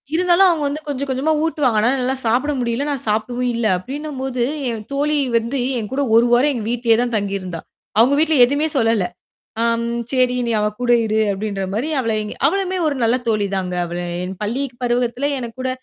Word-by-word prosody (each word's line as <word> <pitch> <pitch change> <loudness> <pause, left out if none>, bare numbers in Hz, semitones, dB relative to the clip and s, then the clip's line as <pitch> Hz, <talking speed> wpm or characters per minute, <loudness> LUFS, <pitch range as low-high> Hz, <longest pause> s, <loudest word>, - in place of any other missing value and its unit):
இருந்தாலும் 360 +2 +5
அவங்க 320 -4 0
வந்து 295 +2 -4
கொஞ்சம், 280 0 -3
கொஞ்சமா 265 +5 0
ஊட்டுவாங்க. 270 -8 +1
ஆனா 230 - +3
என்னால 260 0 0
சாப்பிட 255 +6 +1
முடியல. 235 +2 -1
நான் 270 -5 -4
சாப்பிடவும் 240 +4 -1
இல்ல 230 -1 -1
அப்படின்னும் 280 +7 -6
போது, 255 -2 -1 0.3
என் 220 -2 -5
தோழி 295 +2 +1 0.2
வந்து 235 +4 -2 0.2
என்கூட 245 +6 -3
1 230 +1 +6
வாரம் 265 +5 +4
எங்க 230 -4 -4
வீட்டிலயே 230 -2 +2
தான் 240 -2 -1
தங்கி 200 -1 -2
இருந்தா. 180 -3 -6 0.4
அவங்க 245 +5 +5
வீட்டுல 315 0 +3
எதுவுமே 285 +4 0
சொல்லல. 225 -5 +2 0.6
அம் 230 0 +1 0.3
சரி, 255 -1 +2
நீ - - -1
அவ 210 - +1
கூட 245 -1 +2
இரு, 220 0 0
அப்படின்ற 200 0 -3
மாரி 230 +9 -1
அவளை 225 -3 0 0.3
அவளுமே 375 +2 0
ஒரு 295 - +1
நல்ல 230 +2 +3
தோழி 210 -2 +1
தாங்க. 185 -2 -2
அவ 170 0 -5 0.3
என் 185 +1 -5
பள்ளி 235 +7 -1 0.2
பருவத்துல 245 +3 0
எனக்கூட 255 +1 -5
245 Hz, 185 wpm, -20 LUFS, 225-280 Hz, 0.6 s, 1